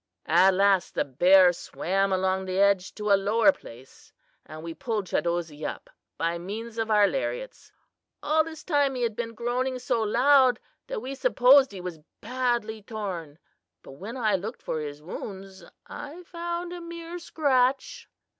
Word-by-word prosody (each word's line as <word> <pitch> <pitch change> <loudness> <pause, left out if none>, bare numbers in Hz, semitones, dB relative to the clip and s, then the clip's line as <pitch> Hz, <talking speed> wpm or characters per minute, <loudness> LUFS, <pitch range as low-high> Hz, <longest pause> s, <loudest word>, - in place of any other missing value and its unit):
"At 190 0 +5
last 195 -1 +2
the - - +1
bear 180 +6 +5
swam 195 +3 -1
along 190 0 0
the 185 0 -3
edge 200 -2 +3
to 210 -1 -2
a - - +8
lower 210 +7 +4
place, 130 - -15 0.4
and 155 0 -9
we 165 0 -6
pulled 215 +1 -3
Chadozee 170 -4 -2
up - - -6 0.3
by 170 +1 -1
means 220 +5 -6
of 225 0 -1
our 210 -1 +5
lariats. - - -4 0.5
All 310 +2 +3
this 315 -1 -9
time 285 -5 +1
he 250 - -2
had 230 -3 -1
been 230 0 -5
groaning 250 +3 -1
so 245 -2 -1
loud 255 +4 +4 0.3
that - - -5
we 270 - -5
supposed 270 - +5
he 190 -2 -8
was 180 -3 -6 0.2
badly 240 -2 -2
torn; 190 -9 -6 0.5
but - - -12
when 200 - -8
I 220 -4 +1
looked 215 +6 -7
for 160 - -3
his 150 0 -7
wounds 190 +1 -8 0.2
I 310 +5 -9
found 345 +1 -5
a 350 - -7
mere 335 +1 -7
scratch." 270 -5 0
220 Hz, 165 wpm, -26 LUFS, 185-265 Hz, 0.5 s, a